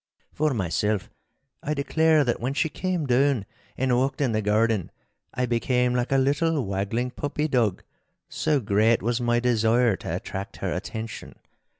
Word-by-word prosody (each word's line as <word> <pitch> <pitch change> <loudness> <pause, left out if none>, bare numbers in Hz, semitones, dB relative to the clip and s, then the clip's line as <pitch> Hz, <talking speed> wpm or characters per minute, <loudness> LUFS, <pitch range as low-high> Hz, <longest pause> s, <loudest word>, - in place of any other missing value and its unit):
For 150 -3 0
myself, 100 0 -1 0.5
I 150 +1 -2
declare 155 +2 +3
that 120 -3 -1
when 130 +4 -2
she 160 - +1
came 180 0 -2
down 130 -3 +2 0.3
and 130 -1 +1
walked 135 +5 0
in 135 -5 +1
the 110 0 0
garden, 105 -2 +1 0.4
I 125 - -1
became 125 +1 +1
like 125 +1 -1
a 135 - +4
little 145 +1 +1
waggling 100 +6 -2
puppy 150 +3 -2
dog, 115 - +1 0.4
so 150 -2 0
great 110 +1 +2
was 120 +1 0
my 120 0 +2
desire 120 -1 +2
to - - -4
attract 95 +1 -6
her - - -2
attention. 110 -1 -6
125 Hz, 160 wpm, -25 LUFS, 110-140 Hz, 0.5 s, a